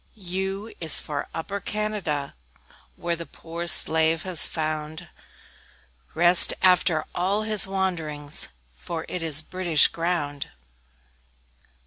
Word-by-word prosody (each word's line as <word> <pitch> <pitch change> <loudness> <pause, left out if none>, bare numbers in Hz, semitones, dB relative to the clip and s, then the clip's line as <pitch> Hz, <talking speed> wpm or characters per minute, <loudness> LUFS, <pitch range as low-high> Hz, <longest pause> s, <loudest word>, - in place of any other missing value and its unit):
U 190 +1 -5
U - - -15
is 160 -3 +5
for 145 -2 -6
Upper 195 +5 -6
Canada, 200 -9 -4 0.6
Where 170 0 -4
the 170 0 -10
poor 170 +1 -9
slave 160 -1 +5
has 180 -4 +3
found 155 +1 -6 1.1
Rest 175 +2 +7
after 180 -4 +2
all 195 +4 -2
his 215 -2 +2
wanderings, 160 -7 -3 0.3
For 160 - -8
it 180 - -6
is 155 -2 +4
British 175 -3 +1
ground! 165 -5 -4
170 Hz, 110 wpm, -23 LUFS, 155-185 Hz, 1.1 s, Rest